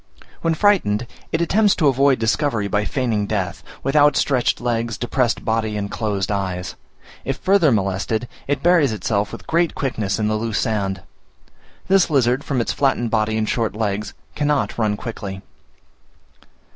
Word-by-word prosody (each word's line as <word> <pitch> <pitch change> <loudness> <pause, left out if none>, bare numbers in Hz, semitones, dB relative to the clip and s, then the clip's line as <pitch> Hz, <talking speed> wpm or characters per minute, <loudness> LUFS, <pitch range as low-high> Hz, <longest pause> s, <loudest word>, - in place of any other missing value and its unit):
When 165 -1 +1
frightened, 150 - +2 0.3
it 160 - 0
attempts 205 +4 +3
to 155 - 0
avoid 135 0 +4
discovery 110 0 0
by 105 +1 0
feigning 115 -6 -1
death, 100 -2 -2 0.2
with 135 +2 -1
outstretched 145 -3 +3
legs, 115 -2 -1
depressed 120 -1 0
body, 110 -1 0
and 100 0 -4
closed 105 -3 -2
eyes: 95 -3 -3 0.5
if 135 0 -2
further 185 -6 +3
molested, 100 +3 -1 0.2
it 145 0 -1
buries 165 -8 +4
itself 105 0 -1
with - - -9
great 170 0 +1
quickness 110 -7 -2
in 105 -1 0
the 110 0 0
loose 115 -2 -2
sand. 95 -4 -1 0.8
This 190 -1 +4
lizard, 130 -2 +2
from 130 -4 -1
its - - -1
flattened 130 -4 +1
body 110 -1 +1
and 110 -1 0
short 115 -2 -1
legs, 105 -2 -2 0.2
cannot 150 -1 0
run 105 -3 0
quickly. 100 -5 -6
115 Hz, 155 wpm, -21 LUFS, 105-140 Hz, 0.8 s, avoid